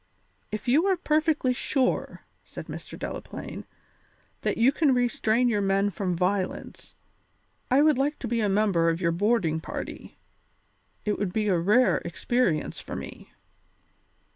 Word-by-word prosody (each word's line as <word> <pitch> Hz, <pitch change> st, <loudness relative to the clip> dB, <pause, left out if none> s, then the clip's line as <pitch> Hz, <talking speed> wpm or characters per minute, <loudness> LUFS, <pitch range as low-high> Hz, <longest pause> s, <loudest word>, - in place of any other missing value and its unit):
"If 215 Hz, +3 st, -5 dB
you 300 Hz, +10 st, +4 dB
are 380 Hz, -2 st, +2 dB
perfectly 305 Hz, -5 st, +1 dB
sure," 255 Hz, +1 st, -1 dB, 0.2 s
said -, -, -9 dB
Mr. -, -, -8 dB
Delaplaine, -, -, -7 dB, 0.8 s
"that -, -, -1 dB
you 235 Hz, +4 st, +5 dB
can 285 Hz, -2 st, +2 dB
restrain 245 Hz, -1 st, +2 dB
your 210 Hz, -4 st, +1 dB
men 195 Hz, +1 st, +1 dB
from 185 Hz, -1 st, -2 dB
violence, 185 Hz, +2 st, -2 dB, 0.7 s
I 270 Hz, +3 st, +5 dB
would 305 Hz, -4 st, +4 dB
like 290 Hz, +2 st, 0 dB
to 245 Hz, -, -5 dB
be 230 Hz, 0 st, 0 dB
a 210 Hz, -, +1 dB
member 195 Hz, -5 st, +2 dB
of 165 Hz, 0 st, -1 dB
your 170 Hz, -2 st, +1 dB
boarding 175 Hz, -3 st, +1 dB
party; -, -, -7 dB, 0.9 s
it 210 Hz, -1 st, 0 dB
would 205 Hz, -3 st, -1 dB
be 210 Hz, +1 st, 0 dB
a 180 Hz, -3 st, +2 dB
rare 215 Hz, +9 st, +4 dB
experience 175 Hz, 0 st, -1 dB
for -, -, -7 dB
me." -, -, -9 dB
215 Hz, 145 wpm, -26 LUFS, 190-255 Hz, 0.9 s, you